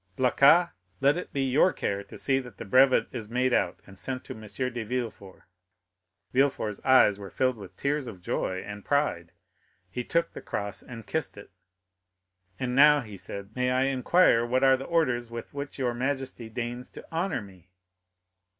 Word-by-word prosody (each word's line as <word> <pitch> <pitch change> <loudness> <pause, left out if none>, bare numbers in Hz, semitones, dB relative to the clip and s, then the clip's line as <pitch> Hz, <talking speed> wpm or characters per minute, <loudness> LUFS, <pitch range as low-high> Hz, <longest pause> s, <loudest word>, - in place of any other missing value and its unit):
Blacas, 140 +7 +5 0.3
let 140 +1 +4
it 180 - -5
be 140 -1 -1
your 145 +8 +4
care 100 0 -2
to - - -11
see 135 -1 +1
that 125 -6 -10
the - - -7
brevet 130 +5 +5
is 110 -4 -6
made 125 +2 +1
out - - +1
and 95 -1 -14
sent 130 -1 -4
to - - -6
M. 110 - -12
de 120 +2 -3
Villefort." 110 -5 -5 0.9
Villefort's 130 -6 +1
eyes 130 -6 +5
were 100 -1 -8
filled 130 +3 +1
with 100 -4 -11
tears 140 -1 -1
of 95 -6 -8
joy 95 +1 -2
and 105 0 -8
pride; 140 - 0 0.6
he 125 - -3
took 170 +6 0
the - - -9
cross 100 -1 -4
and 115 -3 -10
kissed 160 -4 -2
it. 100 - -12 1.1
"And 125 -1 -2
now," 150 +1 +7
he 105 -4 -9
said, 100 +2 -7
"may 125 0 +1
I 130 +1 +2
inquire 135 0 +4
what 130 +3 +1
are 135 0 +6
the 135 +1 -6
orders 130 -8 +1
with 115 0 -8
which 140 0 -6
your 125 -3 0
majesty 130 -2 -3
deigns 120 +2 -5
to - - -10
honor 165 - -1
me?" 95 -2 -16
125 Hz, 180 wpm, -27 LUFS, 105-135 Hz, 1.1 s, now